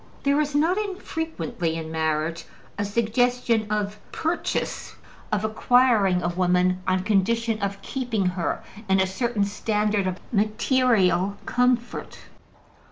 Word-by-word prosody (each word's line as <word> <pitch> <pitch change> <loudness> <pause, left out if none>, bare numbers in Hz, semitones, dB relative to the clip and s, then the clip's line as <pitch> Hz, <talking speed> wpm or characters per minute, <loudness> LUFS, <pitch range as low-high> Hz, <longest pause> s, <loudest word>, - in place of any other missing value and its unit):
There 280 +2 +3
is 290 -1 -2
not 335 +7 +3
infrequently, 320 - -3
in 160 -1 -5
marriage, 160 +1 -1 0.3
a 205 - -2
suggestion 230 +1 +1
of 210 0 -1
purchase, 330 +2 -2 0.4
of 210 0 0
acquiring 220 -4 +3
a 175 - +1
woman 180 +1 +2
on 185 0 +1
condition 220 +2 +1
of 200 0 -3
keeping 240 -7 -2
her 180 -1 -2 0.3
in 190 0 +4
a 190 - +4
certain 210 +3 -1
standard 210 -1 0
of 185 +1 -3
material 215 -3 +2
comfort. 250 -1 0
210 Hz, 120 wpm, -24 LUFS, 185-245 Hz, 0.4 s, in